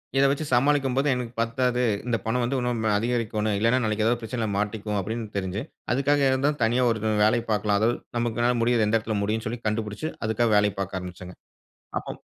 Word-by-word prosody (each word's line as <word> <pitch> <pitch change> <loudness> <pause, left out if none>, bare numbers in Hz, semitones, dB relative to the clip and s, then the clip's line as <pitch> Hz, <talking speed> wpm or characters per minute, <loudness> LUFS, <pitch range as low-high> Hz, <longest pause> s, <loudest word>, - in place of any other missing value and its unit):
இத 135 - +5
வெச்சு 150 +2 -2
சமாளிக்கும்போது 135 +1 +2
எனக்கு 125 -1 -4
பத்தாது, 125 +2 +1 0.2
"இந்த 120 -2 +1
பணம் 120 +2 0
வந்து 130 +3 0
இன்னும் 120 -2 -1
அதிகரிக்கணும், 110 -2 -1
இல்லைனா 115 +4 +3
நாளைக்கு 110 0 0
ஏதாவது 120 +1 +2
பிரச்சனையில 115 0 -3
மாட்டிக்குவோம்" 105 0 -2
அப்படின்னு 110 +4 -3
தெரிஞ்சு, 95 +2 -2 0.3
அதுக்காக 140 +1 +2
தனியா 120 +3 +2
ஒரு 115 -1 0 0.2
வேலை 120 +3 +4
பார்க்கலாம், 105 -1 +1
அதாவது 115 +2 +2 0.2
நமக்கு 120 0 -1
என்னால 120 +1 +3
முடியது 115 -2 +3
எந்த 105 +2 +1
இடத்தில 110 -1 -3
முடியும்னு 110 +2 -1
சொல்லி 115 +2 -4
கண்டுபிடிச்சு, 110 +7 -2 0.2
அதுக்காக 110 +1 +1
வேலை 105 0 +3
பார்க்க 95 -1 -3
ஆரம்பிச்சேங்க. 90 0 -9 0.6
அப்போ - - -8
115 Hz, 175 wpm, -25 LUFS, 105-125 Hz, 0.6 s, இத